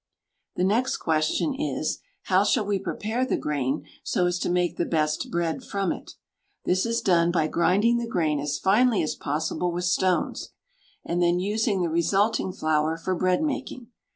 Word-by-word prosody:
The 180 - 0
next 225 +7 +1
question 160 - 0
is, 295 +3 -2 0.2
how 190 +1 +3
shall 215 +1 +2
we 200 -1 0
prepare 220 +5 -2
the 260 - 0
grain 145 0 -2 0.2
so 180 - +1
as 175 0 0
to - - -1
make 175 -1 +1
the 170 - 0
best 155 -1 0
bread 170 +7 -2
from 195 -5 -1
it? - - -7 0.5
This 185 +5 +1
is 230 0 0
done 170 -2 +3
by 165 -3 +1
grinding 205 +9 +2
the 235 - -3
grain 155 -9 0
as 145 0 -2
finely 215 - +3
as 155 - -1
possible 155 +4 -2
with 175 +1 -2
stones, 180 0 0 0.5
and 175 +1 -1
then 175 0 +3
using 205 0 0
the 170 - 0
resulting 195 +5 +1
flour 155 -2 0
for 185 +3 -2
bread 185 - +1
making. 260 -5 -4
180 Hz, 175 wpm, -25 LUFS, 165-210 Hz, 0.5 s, how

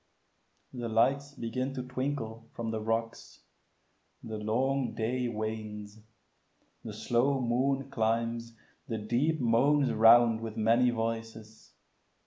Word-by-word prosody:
The 120 -2 -4
lights 140 +6 +1
begin 130 +2 -3
to 130 - -3
twinkle 125 -3 -4
from 115 -1 -3
the 110 -1 -3
rocks; 115 +1 -3 0.8
The 110 -1 -5
long 130 +5 0
day 125 +3 -1
wanes; 110 -1 -5 0.8
the 110 - -6
slow 120 +6 +1
moon 130 +3 0
climbs; 115 +1 -1 0.3
the 115 -4 -3
deep 125 +9 0
Moans 135 +4 +3
round 115 0 +6
with 110 -1 -6
many 115 +3 +3
voices. 115 -1 -5
115 Hz, 115 wpm, -30 LUFS, 110-130 Hz, 0.8 s, round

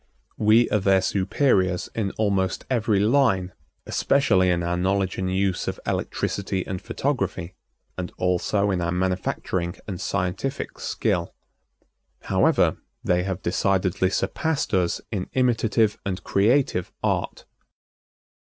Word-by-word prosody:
We 110 +3 +5
are 105 - +3
their 95 0 +4
superiors 95 -2 +1
in 110 -3 -1
almost 100 -3 0
every 110 -4 +2
line, 105 -5 +2 0.3
especially 100 -10 +2
in 85 -1 +1
our 85 +1 0
knowledge 95 +1 0
and 95 0 -1
use 95 -1 0
of - - -3
electricity 95 -1 -2
and 95 -1 -4
photography, 95 -10 -2 0.5
and 90 - -4
also 95 +3 +1
in 90 -2 0
our 85 0 -1
manufacturing 90 -1 -1
and 95 -4 -5
scientific 95 +7 -3
skill. - - -1 0.9
However, - - +2 0.3
they 90 0 +2
have 95 0 -4
decidedly 95 0 +1
surpassed 160 - -1
us 90 -3 +1
in 95 -4 -3
imitative 115 -4 +2
and 95 -2 -4
creative 105 -2 +2
art. - - -1
95 Hz, 120 wpm, -24 LUFS, 90-110 Hz, 0.9 s, We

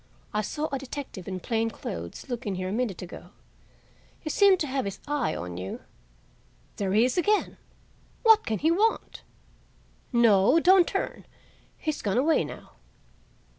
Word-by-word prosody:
I 210 - +1
saw 300 +9 -3
a 275 - -2
detective 265 -8 -7
in 185 -1 -4
plain 225 -1 0
clothes 85 - -7
look 245 -2 -5
in 195 - -1
here 185 0 -3
a - - -4
minute 215 -5 -2
ago. 175 0 -10 0.9
He 310 - -4
seemed 395 0 +5
to - - +1
have 265 -3 -2
his 195 -1 -5
eye 290 - 0
on 90 0 -6
you. 95 +2 -6 1.0
There 195 -2 -1
he 220 +3 +5
is 255 +7 0
again! 420 +4 +1 0.7
What 445 -2 +6
can 220 - -1
he 315 +7 +2
want? 425 +6 0 0.9
No, 235 +3 +5
don't 365 +1 +6
turn; - - -3 0.5
he's 310 -2 -3
gone 205 +1 0
away 295 - +3
now." 150 - -9
240 Hz, 160 wpm, -27 LUFS, 195-310 Hz, 1.0 s, What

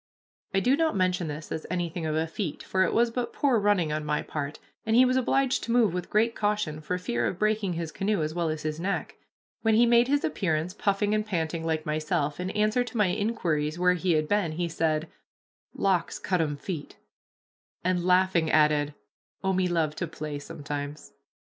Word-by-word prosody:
I 195 -2 +2
do 255 +6 +4
not 320 -2 +1
mention 180 -2 +1
this 150 +1 -6
as 160 - -4
anything 175 -2 -2
of 155 - -1
a 160 +1 +1
feat, 165 0 -4
for 190 - 0
it 170 - +1
was 235 0 +3
but 245 0 -3
poor 265 -6 +2
running 200 -6 +2
on 155 0 -2
my 150 0 -1
part, 145 -1 -4 0.3
and 220 - +1
he 255 +2 +7
was 255 0 +2
obliged 260 +1 +2
to 235 - -3
move 230 -6 +4
with 180 -1 -4
great 225 +2 +2
caution 205 -9 -1
for 180 +4 -2
fear 120 -10 -1
of 175 - -3
breaking 215 -2 +1
his 165 -1 -4
canoe 195 -2 0
as 155 +1 -2
well 170 -1 0
as 155 0 -3
his 155 0 -3
neck. 195 +3 -3 0.4
When 220 -1 +3
he 235 +2 +6
made 235 +1 +5
his 285 +1 +1
appearance, 165 -1 -1
puffing 205 +1 0
and 215 0 +1
panting 165 -5 -2
like 160 -1 -1
myself, 150 -1 -1
in 180 +1 -2
answer 215 +4 +1
to 245 -1 -7
my 210 -3 +3
inquiries 165 -8 -1
where 180 0 +4
he 180 0 +1
had 155 -1 +1
been, 200 -5 +1
he 175 +2 -1
said, 160 -1 0 0.7
"Locks 185 -4 +1
cut 180 -3 0
'em 145 -2 -1
feet," 155 -1 -6 0.9
and, 180 -1 +1
laughing, 180 -2 +3
added, 150 -1 +3 0.5
"Oh, 190 0 +1
me 185 0 +2
love 160 -3 0
to 170 - -2
play 150 -2 -5
sometimes." 145 0 -6
180 Hz, 205 wpm, -27 LUFS, 155-210 Hz, 0.9 s, he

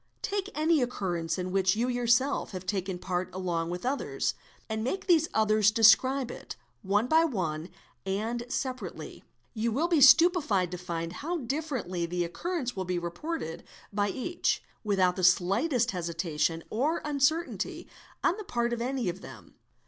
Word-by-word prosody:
Take 400 -2 -2
~ - - -18
any 310 -1 +3
occurrence 175 -9 -2
in 180 0 -3
which 190 0 +2
you 235 +3 0
yourself 245 +1 +1
have 185 -1 -6
taken 190 -1 -2
part 180 0 -2
along 170 -3 -2
with 180 +5 -5
others,; 275 +2 -1 0.3
and 220 0 -3
make 375 +11 -2
these 325 -4 +4
others 215 -1 +4
describe 240 +4 +5
it, - - -8 0.3
one 205 +3 +1
by 320 +5 +4
one 175 - -2 0.3
and 220 +5 -2
separately; 245 - -5 0.3
you 230 0 -1
will 280 +9 +1
_ - - -11
be 320 -4 +4
stupefied 275 - +5
to 180 - -5
find 170 -1 -4
how 340 +4 -3
differently 250 - -3
the 175 +1 -1
occurrence 260 - -3
will 190 - -2
be 180 0 -2
reported 175 - -4 0.3
by 205 0 +1
a - - -2
each, 345 +7 -1 0.2
without 190 -4 +2
the - - -2
shghtest 225 - +3
hesitation 165 -2 -1
or 290 +9 0
uncertainty 300 +3 0 0.4
on 365 - +2
the 425 - -6
part 240 -8 -1
of 235 - -3
any 255 0 -1
£ - - +1
'of 185 +3 -13
them. - - -12
220 Hz, 170 wpm, -29 LUFS, 180-275 Hz, 0.4 s, describe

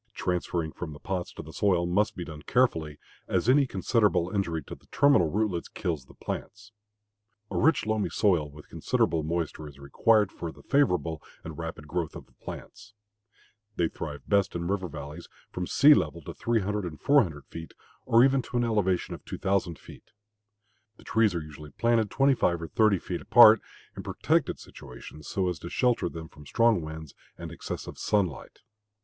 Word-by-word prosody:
Transferring 85 -2 -2
from 80 -2 -7
the 75 - -11
pots 90 -2 -4
to - - -8
the 80 - -11
soil 90 -4 +2
must 95 +5 +1
be 90 - -5
done 75 -2 -9
carefully, 80 -11 +1 0.3
as 95 +3 0
any 135 +2 +5
considerable 100 -3 +1
injury 85 -6 -1
to - - -9
the - - -14
terminal 140 - +4
rootlets 100 -2 -1
kills 85 -10 -4
the - - -18
plants. 105 +1 -7 0.8
A - - -2
rich, 160 0 +3
loamy 110 -1 0
soil 85 -8 +2
with 75 +1 -14
considerable 80 - 0
moisture 80 -1 -3
is 70 -2 -13
required 105 +9 +2
for 85 - -6
the - - -17
favorable 90 - +1 0.2
and 80 -1 -7
rapid 80 -2 -6
growth 85 +1 -3
of - - -9
the - - -30
plants. 100 +2 -11 0.8
They 85 -2 +1
thrive 75 -3 -7
best 100 -3 +2
in 85 0 -2
river 95 -1 -1
valleys, 75 -2 -8 0.2
from 90 0 -4
sea 150 +2 +7
level 85 - -1
to - - -7
300 105 -3 -1
and 80 -4 -6
400 105 - +2
feet 80 0 -10 0.3
or 115 +1 +6
even 135 0 +3
to 120 - -5
an 120 - +2
elevation 105 -6 0
of - - -9
2,000 95 -4 -1
feet. - - -15 0.9
The - - -17
trees 110 -4 +2
are 85 - -2
usually 75 0 -11
planted 115 -2 +2
twenty 135 +5 +3
five 85 -8 +1
or 85 - -5
thirty 110 -3 +3
feet 90 0 -5
apart, 110 -3 +8 0.3
in - - -6
protected - - 0
situations, 65 +4 -12
so 95 -2 -1
as 90 -4 -2
to 85 - -7
shelter 125 -5 +1
them 80 -1 -8
from 75 -1 -15
strong 115 -2 +3
winds 80 -1 -8 0.2
and - - -7
excessive - - -7
sunlight. 95 -8 -1
90 Hz, 180 wpm, -28 LUFS, 80-110 Hz, 0.9 s, apart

